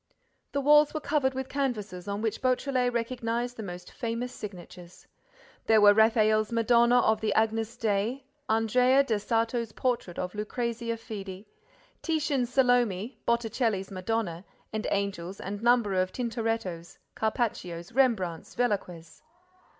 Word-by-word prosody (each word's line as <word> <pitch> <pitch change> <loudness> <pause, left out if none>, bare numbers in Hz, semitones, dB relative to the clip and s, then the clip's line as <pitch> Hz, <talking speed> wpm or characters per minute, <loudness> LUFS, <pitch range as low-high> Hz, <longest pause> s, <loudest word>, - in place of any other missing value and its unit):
The 280 - -1
walls 295 +2 +5
were - - 0
covered 280 -3 0
with 265 0 -3
canvases 215 -11 -3
on 200 +2 -3
which 220 - -2
Beautrelet 255 -1 +1
recognized 235 0 -2
the 225 - -7
most 180 -3 -8
famous 235 +2 -4
signatures. 180 -4 -10 0.6
There 220 -1 +6
were 205 -1 +8
Raphael's 215 0 +3
Madonna 235 +1 +4
of 220 0 +2
the 220 - 0
Agnus 225 0 0
Dei, 225 +5 -1 0.2
Andrea 250 +5 +4
del 225 -6 0
Sarto's 230 +1 -1
Portrait 240 -9 -2
of 180 0 -3
Lucrezia 230 +2 -3
Fede, 200 -3 -8 0.6
Titian's 285 -6 0
Salome, 245 -4 +2
Botticelli's 225 -4 0
Madonna 185 -2 -2 0.3
and 215 0 -2
Angels 195 -2 -2
and 200 +2 -5
numbers 230 -6 +3
of 185 - -2
Tintorettos, 225 -8 -3 0.2
Carpaccios, 200 -7 -2
Rembrandts, 220 -10 0
Velasquez. 190 -8 -2
225 Hz, 125 wpm, -28 LUFS, 200-245 Hz, 0.6 s, were